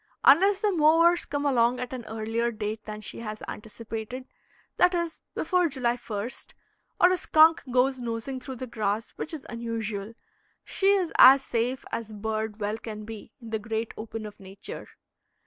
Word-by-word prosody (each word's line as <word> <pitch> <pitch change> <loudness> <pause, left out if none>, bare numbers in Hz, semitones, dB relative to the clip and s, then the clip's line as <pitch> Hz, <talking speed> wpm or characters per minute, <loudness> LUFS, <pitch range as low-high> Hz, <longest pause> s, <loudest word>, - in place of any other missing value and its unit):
Unless 385 +8 +6
the 420 -2 +2
mowers 335 +1 +4
come 285 0 -3
along 245 -2 +3
at 250 0 -5
an 245 -3 -6
earlier 225 +2 -2
date 215 0 -5
than 215 0 -7
she 210 - -4
has 215 -2 -6
anticipated, 225 +3 -7 0.5
that 360 0 +4
is, 340 -1 -3
before 355 +1 +2
July 250 -3 0
lst, 225 -1 -6 0.5
or 355 - +6
a 370 - +2
skunk 320 +1 +5
goes 255 +1 +2
nosing 240 +2 -4
through 260 +1 -7
the 255 - -5
grass, 215 -2 -2
which 315 - -6
is 310 -5 -7
unusual, 225 -2 -4 0.5
she 390 - -1
is 390 -4 +3
as 270 +1 +9
safe 245 +2 -1
as 225 -1 -4
bird 220 0 -3
well 210 +1 -2
can 215 -2 -7
be 220 -1 -9
in 230 -3 -10
the 220 - -1
great 225 +1 -3
open 220 0 -6
of 210 -1 -10
nature. 195 0 -9
235 Hz, 170 wpm, -27 LUFS, 220-275 Hz, 0.5 s, as